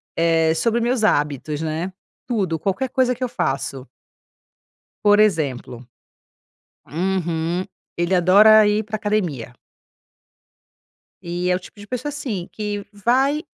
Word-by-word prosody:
eh, 165 -1 +3
sobre 230 +8 +1
meus 240 0 0
hábitos, 150 - 0
né. 160 +3 -3 0.4
Tudo, 195 -9 -1
qualquer 195 - -2
coisa 255 -1 +1
que 250 +1 -6
eu 250 - -1
faço. 135 - -3 1.2
Por 205 0 +6
exemplo 140 - 0 1.0
Uhum. 175 +1 -1 0.3
Ele 175 +2 +1
adora 210 +4 +6
ir 210 +1 +2
para 215 +1 -9
a - - -9
academia. 180 - -2 1.7
E 175 +1 -2
é - - +3
o - - -3
tipo 185 - -16
de 205 - -11
pessoa, 255 +6 -4
assim, 240 -11 -5
que 205 -1 -4
vai 265 - +1
190 Hz, 130 wpm, -21 LUFS, 160-215 Hz, 1.7 s, Por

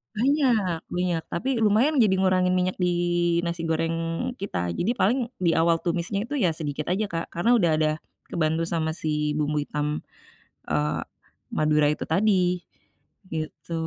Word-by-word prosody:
Banyak, 230 - +1
minyak, 175 -2 -1
tapi 245 +8 -1
lumayan 240 +8 +3
jadi 200 -4 +4
ngurangin 185 -1 +3
minyak 185 0 0
di 180 - +2 0.6
nasi 170 -1 -3
goreng 165 +2 -1
kita. 90 - -2
Jadi 195 - 0
paling 215 +8 +3 0.2
di 175 -2 +2
awal 165 0 +3
tumisnya 180 +3 -1
itu, 290 - -7
ya, 170 -8 +2
sedikit 150 -2 -4
aja, 195 +4 +1
Kak, 165 0 -3
karena 175 +8 +2
udah 170 -6 +3
ada 155 0 +2 0.4
kebantu 160 0 +1
sama 160 -2 -1
si 150 -2 -1
bumbu 150 0 0
hitam, 150 +1 -2 0.7
eee, 75 +1 0 0.5
Madura 150 -1 +3
itu - - -3
tadi, 180 0 +2 0.8
gitu. 160 +1 -5
170 Hz, 145 wpm, -25 LUFS, 155-190 Hz, 0.8 s, jadi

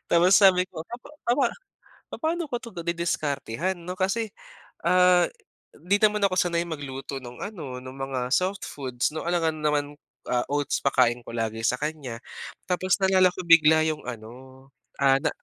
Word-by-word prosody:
Tapos, 180 +2 +5
sabi 190 -3 +6
ko 160 -2 -8 0.4
papa 245 +3 +3 0.6
papaano 330 0 -2
ko 245 - -1
to 235 -2 -11
didiskartehan 170 -1 -2
'no, 175 +1 -6
kasi, 200 +4 -1 0.5
ah, 180 0 +5 0.4
di 195 +4 0
naman 210 -1 +3
ako 195 - +1
sanay 170 -2 +1
magluto 140 -4 -6
nung 120 -1 -10
ano, 160 -11 -6
nung 130 +1 -10
mga 130 -2 -2
soft 185 +3 0
foods 130 -1 -3
'no, 160 - -4
alangan 165 -2 0
naman 150 -1 +1 0.4
ah, 120 -1 +1
oats 145 0 -1
pakain 125 -3 +2
ko - - -8
lagi 115 -1 -2
sa 125 - +2
kanya 150 -6 -4 0.5
tapos 185 +1 +1
naalala 190 -1 +5
ko - - -10
bigla 160 -1 +6
yung 155 -1 -2
ano, 125 +3 -10 0.3
ah, 135 -1 +5
na - - +1
160 Hz, 155 wpm, -26 LUFS, 135-185 Hz, 0.6 s, sabi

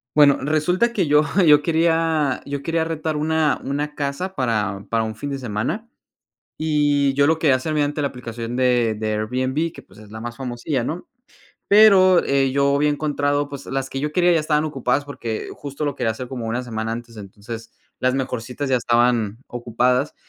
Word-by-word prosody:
Bueno, 145 -2 +6
resulta 180 +10 +1
que 190 -7 0
yo 150 +1 +5 0.2
yo 150 -3 +6
quería 160 -3 +1
yo 140 0 -4
quería 165 +3 0
rentar 160 -1 -3
una 155 0 +1
una 145 +2 -3
casa 145 +7 -3
para 105 -6 -1
para 115 -1 +2
un 110 0 -4
fin 145 +6 -5
de 135 - -3
semana, 125 - -3 0.7
y 145 -3 +2
yo 140 +1 +3
lo 160 +1 +2
quería 145 -5 +4
hacer 155 +4 -3
mediante 150 0 0
la 140 - +1
aplicación 120 -2 -6
de 125 -3 +2
de 110 0 -2
Airbnb 130 +9 -1
que, - - -11
pues, 95 - -20
es 105 -1 -14
la 110 +1 -8
más 120 0 -7
famosilla, 125 +1 -3
¿no? 160 +8 -4 0.6
Pero, 195 -4 +6
eh, 135 -1 +2
yo 140 0 +2
había 150 +1 +2
encontrado 145 -1 0
pues, 140 -1 -8
las 135 0 -3
que 135 - -4
yo 150 +1 -2
quería 175 +1 +3
ya 165 - +3
estaban 150 0 +1
ocupadas, 140 -1 -1
porque 115 -6 -5
justo 145 +1 -5
lo 145 - -1
quería 120 -3 -1
hacer 120 +3 -6
como 125 -3 -5
1 120 +3 -2
semana 110 -2 -4
antes, 115 0 -7
entonces 110 +3 -9 0.3
las 130 0 +1
mejorcitas 130 +1 -3
ya 130 - +3
estaban 120 -3 +1
ocupadas. 125 +3 0
140 Hz, 190 wpm, -21 LUFS, 120-150 Hz, 0.7 s, Bueno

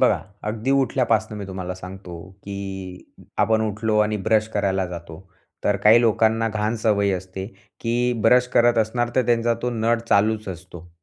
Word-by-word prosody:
बघा, - - +3 0.3
अगदी 115 +4 -3
उठल्यापासनं 120 -5 +1
मी 100 - -6
तुम्हाला 95 -1 -5
सांगतो, 90 -1 -9 0.2
की 95 -2 -7 0.2
आपण 110 0 +3
उठलो 105 +1 -1
आणि 105 0 +2
ब्रश 110 -1 +3
करायला 95 -2 0
जातो, 85 -1 -9 0.4
तर 105 - +2
काही 110 +3 +7
लोकांना 115 0 +2
घाण 105 +1 -1
सवय 105 -2 +1
असते, 95 +1 -5 0.3
की 120 +1 0
ब्रश 125 +2 +5
करत 120 -1 +4
असणार, 120 +2 0
तर 130 -3 +2
त्यांचा 120 -1 +2
तो 125 - 0
नळ 115 0 +1
चालूच 110 +1 +2
असतो. 90 -1 -9
105 Hz, 160 wpm, -22 LUFS, 95-115 Hz, 0.4 s, काही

